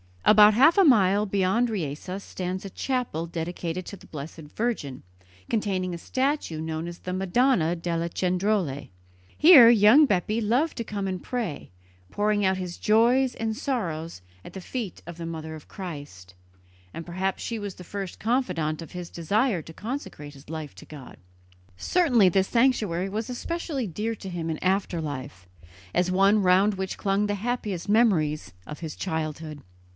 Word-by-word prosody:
About 210 0 +7
half 280 - +5
a 395 - +7
mile 205 - +4
beyond 200 +4 +1
Riese 185 0 -4
stands 185 0 -5
a 195 - -6
chapel 245 - -2
dedicated 170 +1 -4
to 200 - -7
the - - -17
Blessed 155 +2 -8
Virgin, 210 - -3 0.5
containing 190 -4 -1
a - - -4
statue 260 - -1
known 160 +1 -4
as 175 0 -8
the 180 - -6
Madonna 190 -2 +2
delle 170 0 -2
Cendrole. 180 -5 -1 0.5
Here 295 -8 +9
young 235 +6 +7
Bepi 210 +2 0
loved 245 +9 +1
to 230 - -2
come 200 -3 -4
and 185 -1 -3
pray, 225 - -4 0.4
pouring 205 - +1
out 190 0 +2
his 180 -2 -5
joys 240 +4 +3
and 220 -1 -2
sorrows 165 - -3 0.2
at - - -10
the 190 - -7
feet 220 -1 -6
of 170 0 -9
the 170 - -6
Mother 160 -1 -6
of 155 -2 -11
Christ, 145 - -9 0.6
and 165 - -7
perhaps 185 +2 -2
she 230 -1 -3
was 205 -2 -6
the 180 - -11
first 195 0 -6
confidant 180 - -1
of 165 - -10
his 180 -1 -6
desire 200 - 0
to 160 - -11
consecrate 190 - -6
his 140 0 -16
life 155 -2 -6
to - - -13
God. 145 -4 -11 0.6
Certainly 245 - +3
this 190 +2 +2
sanctuary 215 -8 +1
was 215 +4 -4
especially 285 +1 -3
dear 215 +5 -3
to 195 - -8
him 170 -2 -4
in 160 - -4
after 185 -2 0
life, 135 - -7 0.5
as 180 0 +1
one 195 +3 +4
round 190 +2 +4
which 190 0 -4
clung 200 +1 +1
the 205 0 -1
happiest 210 -4 -3
memories 175 - +2
of 150 - -8
his 160 -3 -6
childhood. 155 -3 -4
190 Hz, 165 wpm, -26 LUFS, 165-220 Hz, 0.6 s, Here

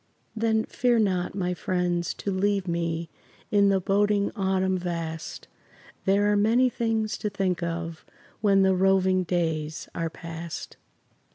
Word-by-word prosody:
Then 220 0 +1
fear 245 -1 +1
not, 185 -5 +1
my 180 -2 -1
friends, 175 -1 -1
to 200 - -3
leave 195 0 0
me 170 -1 -2 0.4
In 200 -1 +5
the 195 -1 +3
boding 200 +1 +2
autumn 190 -2 +1
vast; 170 -3 -4 0.6
There 205 +2 +3
are - - +3
many 230 +5 +4
things 225 -2 -1
to 210 - -1
think 190 -3 -1
of 170 -1 -4 0.4
When 195 -2 +4
the 190 0 +4
roving 190 0 +3
days 160 -3 -2
are 165 -1 -2
past. 165 0 -7
190 Hz, 140 wpm, -26 LUFS, 170-205 Hz, 0.6 s, In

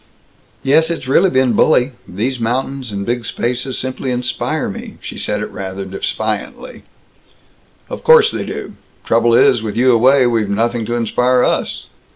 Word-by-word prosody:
"Yes, 160 +5 +3
it's 165 -5 -4
really 175 +8 +4
been 130 -4 +2
bully. 125 +2 +3 0.2
These 120 +7 -3
mountains 130 +2 -2
and 100 -1 -4
big 120 +1 -2
spaces 125 +3 -2
simply 130 +1 -4
inspire 125 0 -2
me." - - -8
She - - -8
said - - -2
it - - -7
rather 95 0 -6
defiantly. 95 - -4 1.1
"Of - - -7
course 470 -1 +6
they - - -3
do! - - -6 0.3
Trouble 115 0 +3
is, 120 -1 +4
with 110 -1 -5
you 130 +1 +4
away, 130 +3 +4
we've 115 -4 0
nothing 115 +2 -1
to 120 - -2
inspire 125 +2 +1
us!" - - -1
125 Hz, 160 wpm, -17 LUFS, 115-130 Hz, 1.1 s, course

